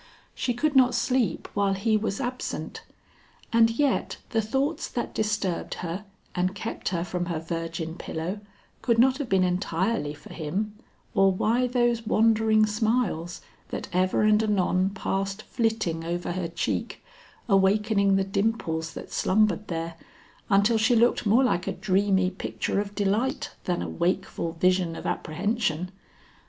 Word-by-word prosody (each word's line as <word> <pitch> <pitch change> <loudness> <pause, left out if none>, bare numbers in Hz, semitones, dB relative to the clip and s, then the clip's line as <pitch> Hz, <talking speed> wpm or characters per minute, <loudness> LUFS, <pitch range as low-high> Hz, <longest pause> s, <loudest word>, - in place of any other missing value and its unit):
She 245 - -1
could 290 +4 0
not 250 -2 +5
sleep 245 0 0
while 200 -1 +2
he 215 +3 +1
was 215 -2 -1
absent; 250 -1 -4 0.7
and 230 0 +6
yet 265 +4 0
the 225 - +2
thoughts 270 +8 -1
that 240 - -4
disturbed 210 -4 -1
her 180 +5 -4 0.3
and 185 +1 0
kept 225 +3 -4
her 170 -2 -1
from 175 0 -3
her 170 -3 -2
virgin 165 0 -4
pillow 175 +6 -4 0.4
could 235 -2 +2
not 260 +3 +4
have 275 -5 -3
been 190 -1 +3
entirely 180 -2 0
for 145 - -13
him, 185 +7 -3 0.4
or 195 0 +5
why 230 +6 +1
those 240 -2 +1
wandering 220 -1 +4
smiles 210 -5 -1 0.3
that - - -5
ever 185 +3 +2
and 215 0 +5
anon 190 -3 +2
passed 195 +1 -3
flitting 220 -8 -1
over 175 +1 -3
her 180 -1 -2
cheek, 170 +1 -3 0.4
awakening 200 0 +3
the 195 - +2
dimples 195 -5 -1
that - - -8
slumbered 210 0 +2
there, 165 -1 -4 0.5
until 205 +3 +4
she 225 +2 +4
looked 235 -1 +3
more 230 +6 +5
like 185 -8 +1
a - - +1
dreamy 190 0 +1
picture 195 +1 -2
of 205 0 -7
delight 210 +6 0
than 175 -1 -1
a - - -4
wakeful 175 -1 -1
vision 180 0 +2
of - - -8
apprehension. 180 0 -1
200 Hz, 145 wpm, -26 LUFS, 180-225 Hz, 0.7 s, and